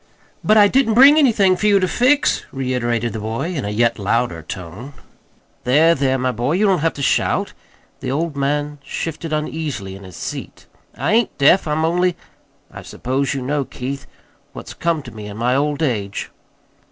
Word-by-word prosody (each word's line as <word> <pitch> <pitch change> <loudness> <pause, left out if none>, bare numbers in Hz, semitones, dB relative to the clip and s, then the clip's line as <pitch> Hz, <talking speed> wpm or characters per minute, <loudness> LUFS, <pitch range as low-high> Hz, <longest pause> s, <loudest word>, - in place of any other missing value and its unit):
"But 215 +1 +4
I 205 -1 +7
didn't 235 -1 +2
bring 280 +5 +8
anything 210 -9 +4
for 210 +4 0
you 200 -1 +5
to 185 - +1
fix," 260 +8 +2
reiterated 120 -3 -1
the 110 - -4
boy, 115 +11 -3
in 140 -9 -3
a - - -2
yet 115 +2 +1
louder 105 -3 0
tone. 95 - -8 0.7
"There, 155 +7 +4
there, 135 -3 +1
my 130 0 0
boy, 125 +5 -1
you 200 +5 +2
don't 190 -4 +3
have 165 +2 0
to 140 - -5
shout." - - +1 0.5
The 130 - -5
old 155 +3 -2
man 145 +1 -1
shifted 165 +3 -5
uneasily 150 -10 -3
hi 100 - -12
his 95 -3 -12
seat. - - -7 0.3
"I 140 - 0
ain't 230 0 +1
deaf. 150 +6 +4
I'm 155 +1 0
only 175 +1 +1 0.5
I - - -9
suppose 135 +2 -2
you 135 - -3
know, 145 +2 -1
Keith, 135 0 -6 0.5
what's - - -9
come 165 -3 -1
to - - -10
me 105 -1 -9
in 105 0 -8
my 125 +2 +1
old 145 +2 0
age." 105 -8 -2
140 Hz, 185 wpm, -19 LUFS, 120-170 Hz, 0.7 s, bring